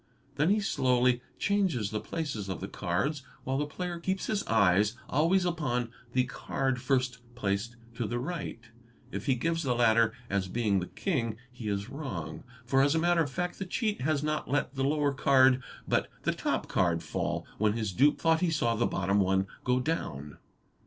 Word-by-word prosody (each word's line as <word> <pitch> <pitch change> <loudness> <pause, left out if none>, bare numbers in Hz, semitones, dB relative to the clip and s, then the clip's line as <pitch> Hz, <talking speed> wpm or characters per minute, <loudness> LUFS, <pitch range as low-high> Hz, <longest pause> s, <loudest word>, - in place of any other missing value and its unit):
Then 150 +4 +2
he 210 +2 +4
slowly 125 -8 +2 0.2
changes 185 - +1
the 105 - -1
places 130 -12 -4
of 95 - -3
the 95 - -4
three - - -10
cards 105 - -1 0.2
while 135 +1 -1
the 150 - -1
player 175 +3 -4
keeps 190 +2 -1
his 210 -2 0
eyes 105 0 +4
always 170 +6 +3
upon 130 -9 -1 0.2
the 125 - +4
card 130 0 -2
first 130 -1 +1 0.2
placed 105 +1 -1 0.2
to 115 -1 -2
the 120 +3 -2
right. 155 0 -4 0.5
If - - -5
he 135 - +4
gives 165 +6 0
the 130 -6 0
latter 115 -1 +4 0.2
as 100 -3 0
being 105 -1 +1
the 90 - -4
king 115 - -2
he 120 -3 -7
is 100 0 -1
wrong, 95 - -5 0.2
for 135 +2 +3
as.a 145 +3 +3
matter 170 +1 +3
of 150 - 0
fact 180 +6 -3
the 195 - -2
cheat 215 - -1
has 150 +1 +1
not 155 0 -1
let 145 0 0
the 135 -1 -1
lower 145 0 +2
card 130 -1 +5 0.3
but - - +1
the - - +1
top - - -1
card 85 -2 +1
fall 80 - -2
when 105 0 +3
his 110 -4 -2
dupe 145 +9 +4
thought 165 0 +3
he 180 - +3
saw 135 -8 +1
the 115 +1 +1
bottom 100 +2 +1
one 95 0 +2 0.2
go 125 0 +2
down. 75 - -3
130 Hz, 190 wpm, -30 LUFS, 110-155 Hz, 0.5 s, card